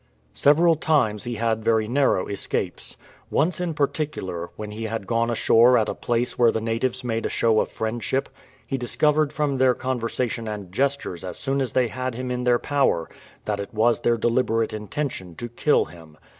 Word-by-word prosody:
Several 165 - +4
times 130 -10 +1
he 120 0 -3
had 110 0 -1
very 110 -1 +2
narrow 130 -6 +2
escapes. 100 -1 -4 0.3
Once 170 +3 +1
in 170 -3 -2
par 145 - +3
ticular, 95 - -4
when 105 -1 -6
he 110 +2 -5
had 110 -2 -4
gone 115 +3 0
ashore 120 +1 +5
at 110 - +1
a - - -1
place 120 +1 -2
where 120 -2 +6
the - - -1
natives 115 +3 -1
made 115 -2 -2
a - - -1
show 110 -2 +2
of - - 0
friendship, 120 +4 -2 0.4
he 135 - -3
discovered 150 +4 +2
from 145 -3 -1
their 130 -1 +4
conversation 120 -2 -2
and 100 -4 -6
gestures 135 -6 -1
as 90 - -6
soon 135 0 -1
as 130 - -2
they 125 -2 +3
had 130 +1 -4
him 125 +1 -4
in 125 0 -2
their 120 -1 +4
power 135 - +1 0.4
that 105 -1 -1
it 100 +3 -7
was 115 +2 +3
their 120 0 +2
deliberate 115 -1 +1
intention 105 - -4
to 120 - -5
kill 120 +6 +2
him. 80 -2 -15
120 Hz, 190 wpm, -24 LUFS, 110-135 Hz, 0.4 s, where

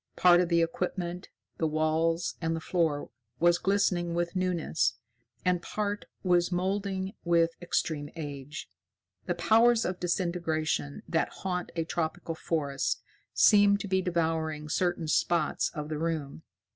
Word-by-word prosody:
Part 175 -1 +6
of 175 - 0
the 170 -1 +4
equipment, 175 +1 -3 0.3
the 160 - +2
walls, 160 +2 +1
and 165 0 0
the - - -3
floor 160 -3 -1 0.3
was 175 +1 +4
glistening 180 -3 +1
with 175 +1 -1
newness, 180 -3 0 0.5
and 180 -1 +2
part 205 +2 -3 0.2
was 175 -1 +3
moulding 190 +1 -1
with 170 -1 +3
extreme 155 -4 -1
age. 145 -2 -6 0.6
The - - 0
powers 230 +1 +4
of 180 0 -2
disintegration 165 - -1
that - - +1
haunt 180 -2 -4
a 165 - 0
tropical 165 0 -2
forest 145 -4 -2 0.3
seemed 205 -1 +6
to - - -5
be 190 0 +2
devouring 160 -3 -1
certain 175 0 0
spots 160 0 +1
of 150 -1 -4
the 155 -1 -3
room. 155 - -3
170 Hz, 135 wpm, -29 LUFS, 160-180 Hz, 0.6 s, Part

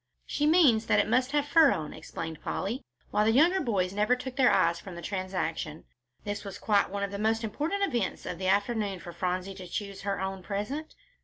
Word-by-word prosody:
"She 295 - 0
means 295 -10 +5
that - - +4
it - - +3
must 250 +4 +2
have 290 -1 +2
fur 310 0 +6
on," 155 -1 -3
explained 160 -1 -7
Polly, 235 +8 -3 0.3
while 210 - +3
the 220 - +4
younger 335 +10 +5
boys 190 -5 0
never 210 +5 +3
took 255 0 -7
their 265 -3 +5
eyes 170 -3 +3
from 180 0 -9
the 170 - -7
transaction. 185 -5 -3 0.4
This 205 0 -4
was 200 -2 -7
quite 205 -2 +2
one 200 +1 -3
of 200 - -2
the 200 - -5
most 225 +2 +1
important 300 - -1
events 240 - -1
of 175 - -5
the 185 - -2
afternoon 200 0 +1
for 175 0 -9
Phronsie 185 +2 -2
to 185 -1 -9
choose 200 +2 -5
her 195 -1 -2
own 190 0 -3
present. 210 - -4
205 Hz, 215 wpm, -29 LUFS, 185-250 Hz, 0.4 s, fur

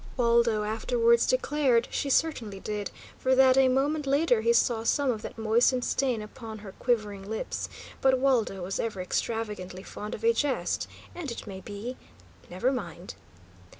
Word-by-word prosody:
Waldo 235 -3 +3
afterwards 465 - +2
declared 295 - +2
she 280 - -1
certainly 245 -10 0
did, 210 0 -4 0.3
for 260 0 +2
that 260 0 +6
a 265 0 +5
moment 280 +3 +1
later 275 -4 +3
he 230 +1 +3
saw 235 -1 +3
some 275 +3 +2
of 220 -3 -4
that - - -8
moistened 235 +3 +2
stain 250 -5 0
upon 220 +1 -9
her 205 -2 -9
quivering 210 -5 -1
lips; 220 - -3 0.3
but 265 -1 +4
Waldo 245 -8 +1
was 190 +2 -3
ever 220 -4 -2
extravagantly 185 -1 -3
fond 210 +1 -6
of - - -11
a 460 0 +5
jest, 290 - -1 0.3
and 345 -5 -5
it 235 - -6
may 195 -3 -7
be 210 +6 -6 0.5
never 185 +9 0
mind! 180 -8 -5
235 Hz, 160 wpm, -28 LUFS, 210-270 Hz, 0.5 s, that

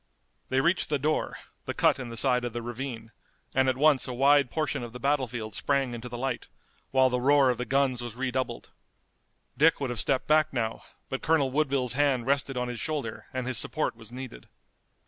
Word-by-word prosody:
They 130 +1 +2
reached 170 +5 +1
the 150 - +1
door, 150 +3 -1 0.3
the - - -4
cut - - +3
in 125 -2 -6
the 115 - -6
side 125 0 +3
of 120 - -3
the 120 -1 -4
ravine, 120 -1 -6 0.4
and 130 0 +3
at 130 - 0
once 145 -2 +4
a 125 - -4
wide 140 +1 +4
portion 155 -2 -2
of 120 -1 -7
the 125 - -8
battlefield 125 -6 -1
sprang 135 +2 0
into 120 +1 -7
the 120 - -6
light, 130 0 -3 0.4
while 130 -1 +3
the 125 0 0
roar 140 0 +5
of 125 - -4
the 125 - -2
guns 135 -2 +1
was 120 -2 -6
redoubled. 130 0 -3 0.9
Dick 165 +2 +5
would 135 -3 -2
have 120 - -1
stepped 130 -2 0
back 155 0 +3
now, 115 -3 -2 0.3
but 135 - -4
Colonel 150 -4 +2
Woodville's 135 -4 +1
hand 135 -3 +1
rested 140 -1 0
on 125 0 -1
his 120 -1 -5
shoulder 145 -8 -4
and 130 -1 -3
his 125 -3 +2
support - - -1
was 115 0 -11
needed. 125 - -9
130 Hz, 205 wpm, -28 LUFS, 120-140 Hz, 0.9 s, roar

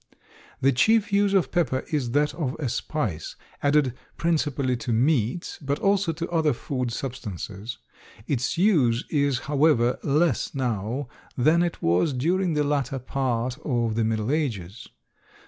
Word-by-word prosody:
The 135 - +4
chief 215 - +3
use 200 0 +3
of 190 - +2
pepper 145 -8 0
is 140 -6 0
that 145 +3 +1
of 145 -3 -3
a 145 -6 -2
spice, 115 - -3 0.3
added 145 -3 +3 0.2
principally 145 -6 0
to 120 - -4
meats, 125 +4 +1
but 140 0 -1
also 195 -3 +2
to 170 +1 -4
other 160 -4 +2
food 125 0 -3
substances. 110 -3 -6 0.5
Its 130 0 -1
use 145 - +3
is, 140 -4 +1
however, 140 -4 +2
less 155 +2 +1
now 120 +1 -2 0.3
than 155 +7 +4
it 175 -1 -2
was 90 - +2
during 175 +7 +1
the 150 - +2
latter 140 -2 0
part 125 -1 -2
of 120 -6 0
the 115 +1 +1
Middle 110 +2 0
Ages. 115 - -2
135 Hz, 145 wpm, -25 LUFS, 120-155 Hz, 0.5 s, The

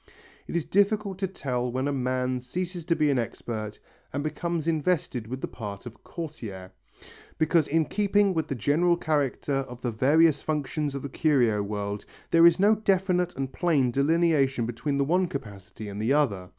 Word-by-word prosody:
It - - -6
is 170 - 0
difficult 200 -1 +1
to 195 - 0
tell 125 -8 -3
when 130 +3 -1
a 145 - 0
man 130 -1 -1
ceases 175 +7 -5
to 170 - +2
be 150 -2 +2
an 135 - +1
expert 110 -2 -4 0.3
and 145 +1 -3
becomes 160 +1 -2
invested 155 -7 0
with 130 +3 -5
the - - -2
part 100 -1 -7
of 120 -1 -11
courtier, 110 - -7 0.7
because 160 -1 +3
in 160 +1 +2
keeping 205 0 +2
with 160 -3 -1
the 140 - -3
general 165 +8 +2
character 145 -3 0
of 130 -3 -5
the 120 - -1
various 150 +7 +4
functions 150 -1 -2
of 140 - -5
the 140 - -4
curio 125 -8 +2
world, 100 0 -4 0.3
there 165 0 +8
is 170 +1 +4
no 205 +3 +5
definite 190 -4 +1
and 135 -1 -4
plain 145 -8 +2
delineation 140 -3 +2
between 130 +5 -2
the 140 - +2
one 180 +5 +2
capacity 105 - -8
and 100 +1 -5
the 115 +5 +2
other. 100 -12 +1
145 Hz, 180 wpm, -27 LUFS, 125-170 Hz, 0.7 s, there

